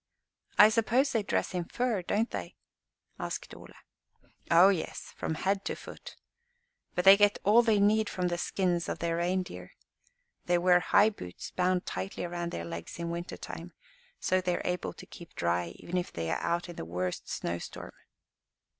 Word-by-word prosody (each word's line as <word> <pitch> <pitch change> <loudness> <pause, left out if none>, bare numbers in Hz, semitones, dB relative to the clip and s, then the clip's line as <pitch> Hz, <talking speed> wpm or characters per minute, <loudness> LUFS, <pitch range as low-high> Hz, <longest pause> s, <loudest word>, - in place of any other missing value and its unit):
"I 210 - +9
suppose 235 +5 +2
they 225 - +1
dress 200 - -1
in 175 -2 -2
fur, 240 0 -1
don't 210 +6 0
they?" - - -5 0.6
asked - - -5
Ole. - - -12 0.8
"O 175 +3 +7
yes, 185 -5 -3
from 160 - -3
head 195 +4 0
to - - -2
foot. - - -10 0.8
But 180 - 0
they 195 +1 +11
get 205 0 +4
all 215 +4 +6
they 220 -3 +3
need 210 +1 +3
from 180 -1 -1
the 175 0 -2
skins 175 -2 0
of - - -2
their 170 0 -1
reindeer. 180 +2 -2 0.7
They 175 0 +4
wear 175 0 +5
high 205 +4 +4
boots 90 - -9
bound 180 0 +1
tightly 95 +1 -4
around 175 0 -3
their 85 - -4
legs 85 0 -7
in 170 0 -3
winter 170 +1 -5
time, - - -8 0.5
so 185 0 +1
they 180 -1 0
are - - -5
able 180 0 -2
to - - -12
keep 170 - -13
dry, 85 0 0
even 180 - -4
if 180 - -2
they 80 -1 -3
are - - -1
out 170 +1 -1
in 175 - -9
the - - -4
worst 90 +2 -3
snow 85 0 -3
storm." - - -8
180 Hz, 180 wpm, -30 LUFS, 170-200 Hz, 0.8 s, they